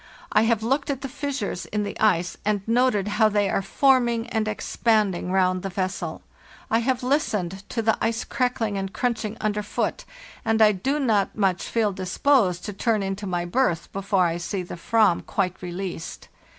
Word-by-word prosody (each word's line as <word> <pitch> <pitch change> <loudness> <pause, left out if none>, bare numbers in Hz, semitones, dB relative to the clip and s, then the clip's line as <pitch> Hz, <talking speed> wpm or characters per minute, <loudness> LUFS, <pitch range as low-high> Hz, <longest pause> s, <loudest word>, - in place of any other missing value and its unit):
I 220 - +4
have 225 -1 +1
looked 270 +5 0
at 275 -1 -2
the 270 - -3
fissures 270 -9 -4
in 210 0 -1
the 205 - -4
ice 180 -5 +2
and 205 -1 -1
noted 230 -4 +2
how 215 +1 +3
they 205 -2 +1
are - - +1
forming 240 +1 +2
and 220 -2 -1
expanding 210 -4 0
round 185 -1 +2
the 195 - -4
vessel; 185 +1 -3 0.5
I 225 - +4
have 250 +1 0
listened 210 - 0
to 230 - -2
the 225 0 +3
ice 230 +1 0
crackling 230 -5 -1
and 195 0 -4
crunching 225 -2 -2
underfoot, 210 -1 -2 0.4
and 225 0 +1
I 215 -1 +7
do 260 +9 -1
not 215 -8 +2
feel - - -25 0.5
much 195 - -7
disposed 185 -1 +2
to 210 - -4
turn 215 +1 0
into 195 +1 -3
my 175 -1 -1
berth 175 -3 0
before 195 -1 +1
I 170 0 0
see 185 +2 -3
the 175 - -8
/vam 210 +1 +2
quite 185 -2 -2
released. 180 -1 -6
210 Hz, 175 wpm, -24 LUFS, 190-230 Hz, 0.5 s, I